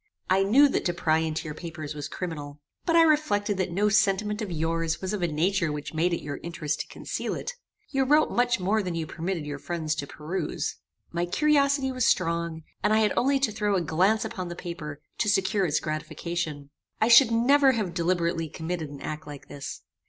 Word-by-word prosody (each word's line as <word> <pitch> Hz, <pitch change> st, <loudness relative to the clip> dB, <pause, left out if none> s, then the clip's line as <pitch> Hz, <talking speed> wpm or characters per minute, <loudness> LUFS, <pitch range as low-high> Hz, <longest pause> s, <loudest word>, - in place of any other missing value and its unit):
I 190 Hz, +1 st, +5 dB
knew 245 Hz, +9 st, +6 dB
that -, -, -1 dB
to 175 Hz, -, 0 dB
pry 160 Hz, -2 st, +2 dB
into 160 Hz, 0 st, -2 dB
your 150 Hz, -, -4 dB
papers 155 Hz, -2 st, -6 dB
was 145 Hz, -1 st, -5 dB
criminal; 150 Hz, -4 st, -6 dB, 0.3 s
but 335 Hz, -, +3 dB
I 335 Hz, -, +8 dB
reflected 215 Hz, -, +2 dB
that 185 Hz, -, 0 dB
no 200 Hz, +5 st, +2 dB
sentiment 210 Hz, 0 st, +2 dB
of 205 Hz, -4 st, -4 dB
yours 165 Hz, 0 st, -1 dB
was 190 Hz, +2 st, -3 dB
of 205 Hz, -, -2 dB
a 175 Hz, -, +2 dB
nature 170 Hz, +2 st, +1 dB
which 150 Hz, +1 st, -5 dB
made 165 Hz, +3 st, +1 dB
it 170 Hz, -, -2 dB
your 145 Hz, -1 st, -4 dB
interest 160 Hz, -3 st, -3 dB
to -, -, -4 dB
conceal -, -, -4 dB
it. -, -, -4 dB, 0.4 s
You 270 Hz, -2 st, +2 dB
wrote 300 Hz, +4 st, +4 dB
much 245 Hz, -2 st, +2 dB
more 205 Hz, +4 st, +1 dB
than 180 Hz, -3 st, -3 dB
you 165 Hz, -1 st, -2 dB
permitted 165 Hz, 0 st, -3 dB
your 145 Hz, -1 st, -5 dB
friends 160 Hz, -1 st, -2 dB
to 140 Hz, -, -3 dB
peruse. 160 Hz, +7 st, -3 dB, 0.3 s
My 170 Hz, +1 st, -1 dB
curiosity 280 Hz, -, +2 dB
was 255 Hz, -2 st, +1 dB
strong, 170 Hz, -2 st, 0 dB, 0.2 s
and -, -, +3 dB
I -, -, +5 dB
had 215 Hz, -, +2 dB
only 275 Hz, +2 st, +3 dB
to 255 Hz, -6 st, +2 dB
throw 205 Hz, -1 st, 0 dB
a 185 Hz, -, +2 dB
glance 185 Hz, +7 st, +2 dB
upon 185 Hz, -2 st, -4 dB
the 175 Hz, -, -6 dB
paper, 155 Hz, -5 st, -6 dB, 0.2 s
to 210 Hz, -, +2 dB
secure 195 Hz, 0 st, +2 dB
its 150 Hz, -, +1 dB
gratification. 155 Hz, -1 st, -4 dB, 0.3 s
I 220 Hz, -, +3 dB
should 235 Hz, +1 st, +8 dB
never 265 Hz, +4 st, +4 dB
have 210 Hz, -7 st, -2 dB
deliberately 170 Hz, -2 st, 0 dB
committed 160 Hz, 0 st, -4 dB
an 140 Hz, -1 st, -10 dB
act 155 Hz, 0 st, -5 dB
like 145 Hz, -2 st, -10 dB
this. 140 Hz, -, -7 dB
175 Hz, 210 wpm, -27 LUFS, 160-215 Hz, 0.4 s, I